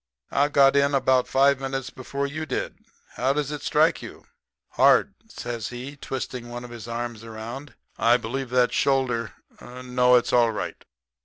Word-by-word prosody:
'I 140 Hz, +1 st, +3 dB
got 140 Hz, -2 st, +5 dB
in 140 Hz, 0 st, +3 dB
about 130 Hz, -1 st, +2 dB
five 140 Hz, 0 st, +3 dB
minutes 135 Hz, -1 st, -4 dB
before 140 Hz, +2 st, -4 dB
you 155 Hz, +3 st, -5 dB
did. -, -, -3 dB, 0.4 s
How 130 Hz, +2 st, +2 dB
does 150 Hz, 0 st, -2 dB
it 150 Hz, -1 st, -5 dB
strike 155 Hz, +3 st, +2 dB
you?' -, -, -11 dB, 0.4 s
"'Hard,' -, -, +4 dB, 0.2 s
says 120 Hz, -, -5 dB
he, 125 Hz, +4 st, -7 dB
twisting 130 Hz, -3 st, -6 dB
one 120 Hz, 0 st, -7 dB
of 120 Hz, -, -10 dB
his 115 Hz, -1 st, -9 dB
arms 115 Hz, -1 st, -5 dB
around. 115 Hz, +5 st, -8 dB, 0.2 s
'I 120 Hz, +1 st, +5 dB
believe 125 Hz, +3 st, -4 dB
that 125 Hz, 0 st, +2 dB
shoulder 125 Hz, -5 st, +1 dB, 0.3 s
no, 125 Hz, 0 st, +1 dB
it's 120 Hz, -, +2 dB
all 120 Hz, -1 st, +5 dB
right.' 110 Hz, -, -5 dB
125 Hz, 165 wpm, -25 LUFS, 120-140 Hz, 0.4 s, got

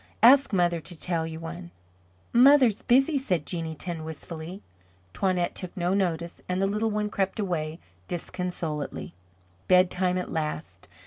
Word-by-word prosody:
"Ask 275 Hz, +4 st, +7 dB
mother 175 Hz, -3 st, +2 dB
to 165 Hz, 0 st, -8 dB
tell 165 Hz, -2 st, -1 dB
you 160 Hz, 0 st, -7 dB
one." 170 Hz, +2 st, -7 dB, 0.6 s
"Mother's 255 Hz, -3 st, +6 dB
busy," 270 Hz, +4 st, +3 dB
said 180 Hz, -, -1 dB
Jeanneton 165 Hz, 0 st, -3 dB
wistfully. 160 Hz, +3 st, -7 dB, 0.5 s
Toinette 180 Hz, -, 0 dB
took 185 Hz, +1 st, -7 dB
no 175 Hz, +1 st, +1 dB
notice 170 Hz, -3 st, -1 dB
and 180 Hz, 0 st, 0 dB
the 195 Hz, -, +2 dB
little 210 Hz, +3 st, 0 dB
one 210 Hz, 0 st, -1 dB
crept 195 Hz, +2 st, -1 dB
away 165 Hz, -5 st, -2 dB, 0.3 s
disconsolately. 175 Hz, -4 st, -4 dB, 0.5 s
Bedtime 180 Hz, 0 st, +3 dB
at 180 Hz, -, -4 dB
last. 155 Hz, 0 st, -4 dB
180 Hz, 135 wpm, -27 LUFS, 165-200 Hz, 0.6 s, Ask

